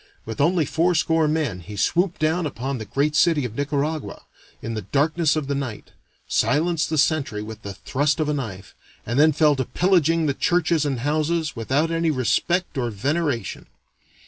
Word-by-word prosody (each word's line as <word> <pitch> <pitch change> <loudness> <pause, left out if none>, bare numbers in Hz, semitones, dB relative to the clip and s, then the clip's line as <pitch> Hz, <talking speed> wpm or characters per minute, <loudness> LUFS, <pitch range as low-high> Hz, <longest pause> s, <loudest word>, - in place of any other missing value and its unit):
With 115 +4 -4
only 165 +1 +3
fourscore 165 0 +2
men, 150 -11 -1
he 105 +4 -9
swooped 175 - +1
down 160 +2 +1
upon 135 -1 -4
the 110 - -6
great 145 +6 0
city 155 -4 +3
of 115 - -5
Nicaragua 145 +2 -2 0.4
in 115 - -5
the 110 - -3
darkness 150 - +1
of 155 -2 -1
the 140 - -2
night, 135 -6 -5 0.4
silenced 165 +2 +1
the 155 - -1
sentry 140 -8 +1
with 110 0 -9
the 100 -2 -7
thrust 145 +9 0
of 155 - 0
a 150 - 0
knife, 100 -9 -6 0.3
and 120 +5 -1
then 155 +1 +6
fell 150 0 +3
to 130 - 0
pillaging 165 +2 +2
the 140 - +1
churches 170 0 +1
and 135 -4 -2
houses 155 +3 0
"without 135 +8 0
any 165 0 +1
respect 155 +5 0
or 120 -2 -1
veneration." 135 - -2
150 Hz, 175 wpm, -23 LUFS, 130-160 Hz, 0.4 s, then